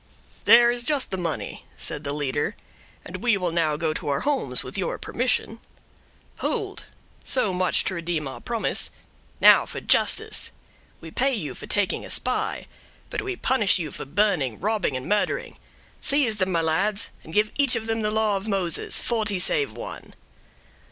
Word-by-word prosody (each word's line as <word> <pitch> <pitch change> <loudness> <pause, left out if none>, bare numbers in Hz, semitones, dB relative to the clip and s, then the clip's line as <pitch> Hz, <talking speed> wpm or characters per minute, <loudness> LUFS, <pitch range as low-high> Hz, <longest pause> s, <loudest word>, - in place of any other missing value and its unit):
"There 235 +1 +7
is 240 0 +1
just 285 0 0
the 190 - -1
money," 165 -3 -4
said 150 - -1
the 140 - -2
leader; 145 +6 -2 0.5
"and - - -6
we 235 -4 +2
will 180 -3 -1
now 160 -3 +1
go 155 0 -1
to - - -5
our 140 - 0
homes, 260 - +1
with 130 - -9
your 190 -3 -1
permission." 245 -2 -1 0.8
"Hold! 410 -4 -2 0.4
so 215 -7 +3
much 180 0 +1
to - - -2
redeem 170 -4 -2
our 135 - -8
promise—now - - +2
for - - -6
justice; - - +3 0.5
we 160 - -9
pay 265 +6 +1
you 170 -10 -4
for - - -10
taking 205 -2 0
a - - -9
spy, - - -1 0.5
but - - -2
we 390 -2 -4
punish 260 - +2
you 160 -5 -4
for - - -6
burning, 155 - 0
robbing, 205 -9 0
and 130 - -7
murdering. 210 - 0 0.4
Seize 275 -7 +2
them, 190 -1 0
my 170 -2 +1
lads, 195 +7 +1
and 160 - -11
give 210 +4 +2
each 280 -3 +3
of 220 - -3
them 225 0 -1
the 210 - 0
law 215 -1 +1
of 195 +3 -6
Moses—forty 200 +3 0
save 420 - +2
one." - - -9
200 Hz, 170 wpm, -24 LUFS, 160-235 Hz, 0.8 s, There